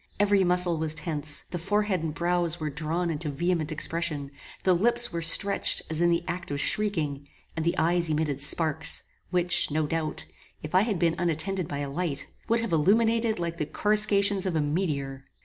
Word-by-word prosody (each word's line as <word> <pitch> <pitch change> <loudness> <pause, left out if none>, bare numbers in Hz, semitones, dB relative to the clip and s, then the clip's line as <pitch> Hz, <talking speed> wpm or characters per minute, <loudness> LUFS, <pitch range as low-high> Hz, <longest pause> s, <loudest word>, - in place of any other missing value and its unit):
Every 200 -1 +3
muscle 180 -2 +3
was 155 -1 +1
tense; 155 -2 -3
the 175 - -3
forehead 205 0 0
and 160 -1 -3
brows 175 +1 0
were 155 -2 -3
drawn 165 +4 -1
into 155 0 -3
vehement 165 +2 -1
expression; 155 -2 -2 0.3
the 185 - +4
lips 235 +4 +3
were 170 - -2
stretched 200 +4 +3
as 160 +1 -2
in 175 - +4
the 170 0 +1
act 175 +1 -5
of 145 0 -3
shrieking, 150 -9 -1 0.3
and 160 - -2
the 170 - 0
eyes 170 +1 +1
emitted 150 -3 -1
sparks, 155 +1 +2 0.3
which, 175 0 +2
no 155 +1 0
doubt, 155 0 -3 0.4
if 150 - -7
I 185 - +5
had 210 -2 -1
been 165 -1 +2
unattended 175 +2 -1
by 140 - -5
a 140 - -4
light, 160 -2 -3 0.2
would 230 0 +2
have 230 - -4
illuminated 225 +7 +2
like 170 -1 -4
the 150 - -2
coruscations 200 0 +2
of 180 - -2
a 155 - +2
meteor. 145 -4 -2
170 Hz, 185 wpm, -27 LUFS, 155-185 Hz, 0.4 s, I